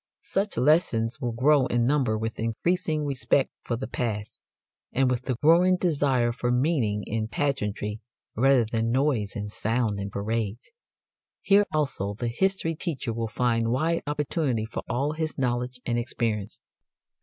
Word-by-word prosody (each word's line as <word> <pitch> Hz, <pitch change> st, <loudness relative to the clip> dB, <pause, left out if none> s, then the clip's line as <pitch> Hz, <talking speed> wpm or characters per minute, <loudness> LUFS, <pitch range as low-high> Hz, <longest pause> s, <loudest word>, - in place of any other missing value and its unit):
Such 200 Hz, -, -1 dB
lessons 120 Hz, -5 st, +2 dB
will 120 Hz, -, -1 dB
grow 130 Hz, +3 st, +3 dB
in 120 Hz, -1 st, +1 dB
number 130 Hz, -5 st, +2 dB
with 110 Hz, +1 st, -4 dB
increasing 155 Hz, +6 st, 0 dB
respect 140 Hz, 0 st, +1 dB
for 120 Hz, -, -2 dB
the 130 Hz, +3 st, -4 dB
past, 105 Hz, -4 st, -4 dB, 0.5 s
and 130 Hz, +1 st, +2 dB
with 125 Hz, 0 st, -2 dB
the 130 Hz, -, 0 dB
growing 175 Hz, +4 st, +5 dB
desire 140 Hz, -9 st, +2 dB
for 120 Hz, 0 st, -2 dB
meaning 125 Hz, -6 st, +1 dB
in 110 Hz, 0 st, -2 dB
pageantry, 105 Hz, -4 st, -2 dB, 0.4 s
rather 130 Hz, 0 st, +4 dB
than 115 Hz, +1 st, -1 dB
noise 125 Hz, -5 st, +1 dB
and 105 Hz, -1 st, -4 dB
sound 110 Hz, -1 st, -1 dB
in 100 Hz, 0 st, -4 dB
parades. 105 Hz, +2 st, -3 dB, 0.7 s
Here 205 Hz, 0 st, +5 dB
also 135 Hz, -10 st, -1 dB
the 120 Hz, +2 st, -2 dB
history 190 Hz, +4 st, 0 dB
teacher 155 Hz, -, -3 dB
will 115 Hz, 0 st, -2 dB
find 115 Hz, 0 st, 0 dB
wide 160 Hz, +7 st, +1 dB
opportunity 145 Hz, -5 st, -1 dB
for 110 Hz, -, -5 dB
all 135 Hz, +5 st, 0 dB
his 155 Hz, 0 st, -3 dB
knowledge 125 Hz, -1 st, -1 dB
and 120 Hz, -1 st, 0 dB
experience. 115 Hz, -4 st, -3 dB
125 Hz, 150 wpm, -26 LUFS, 115-145 Hz, 0.7 s, growing